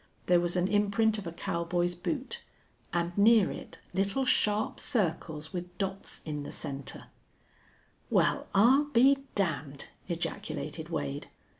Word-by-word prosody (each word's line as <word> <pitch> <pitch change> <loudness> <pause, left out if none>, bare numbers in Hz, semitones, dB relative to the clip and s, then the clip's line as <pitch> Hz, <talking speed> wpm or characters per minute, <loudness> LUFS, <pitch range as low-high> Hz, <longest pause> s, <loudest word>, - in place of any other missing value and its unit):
There 175 -1 +5
was 175 0 -1
an 180 0 +2
imprint 210 +2 +2
of 190 - -7
a - - -3
cowboy's 175 0 -1
boot, 275 - -4 0.5
and 175 0 -1
near 215 0 +6
it - - -8 0.2
little 200 +8 +1
sharp 210 -3 +2
circles 160 - -1
with 180 0 -6
dots 195 0 -4
in 150 -2 -3
the 145 - -6
center. 135 -1 -6 1.0
"Well, - - +2
I'll 255 +9 +6
be 275 0 +5 0.2
damned!" 155 -7 -2 0.2
ejaculated - - -4
Wade. 70 -1 -3
190 Hz, 130 wpm, -30 LUFS, 170-215 Hz, 1.0 s, near